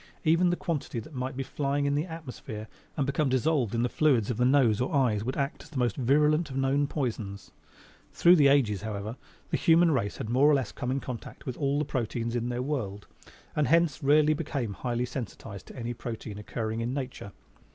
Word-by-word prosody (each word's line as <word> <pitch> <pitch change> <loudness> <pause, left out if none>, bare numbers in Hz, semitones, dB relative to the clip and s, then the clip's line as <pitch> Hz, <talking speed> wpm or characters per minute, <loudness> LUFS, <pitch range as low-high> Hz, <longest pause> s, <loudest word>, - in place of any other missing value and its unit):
Even 170 +2 +4
the 175 - +2
quantity 150 -8 -3
that 135 +8 -11
might 130 0 -4
be 135 - -1
flying 140 +1 -1
in 140 - +1
the 150 +3 0
atmosphere 125 -9 -7 0.3
and 140 - +1
become 140 +1 +1
dissolved 130 -3 +1
in 115 - +1
the - - +2
fluids 125 -6 +2
of 115 - -3
the 125 - +2
nose 125 -5 +4
or 125 - -1
eyes 115 -7 +2
would 130 +3 -3
act 140 0 -2
as - - -14
the 150 - -7
most 120 -4 +1
virulent 150 +5 +3
of 130 - -5
known 135 +2 +2
poisons. 110 -9 -4 0.6
Through 175 +1 +6
the 145 -3 +6
ages, 125 -9 +3
however, 105 +1 -4 0.4
the - - +2
human 165 0 +5
race 115 -8 -1
had - - -4
more 130 +6 +4
or 150 - +5
less 135 -2 -1
come 125 - -4
in 135 +1 0
contact 125 -3 -8
with 130 - -4
all 140 -1 0
the 150 - 0
proteins 115 -2 -2
in 120 0 -1
their 125 +1 -2
world 105 -9 -3 0.5
and 150 -3 +2
hence 165 +1 +3
rarely 150 +2 +5
became 140 -8 -3
highly 120 +5 -2
sensitized 115 -5 -7
to - - -11
any 120 -2 -4
protein 115 -3 -6
occurring 110 +1 -3
in 120 +3 -2
nature. 130 -7 -5
130 Hz, 215 wpm, -28 LUFS, 115-145 Hz, 0.6 s, Through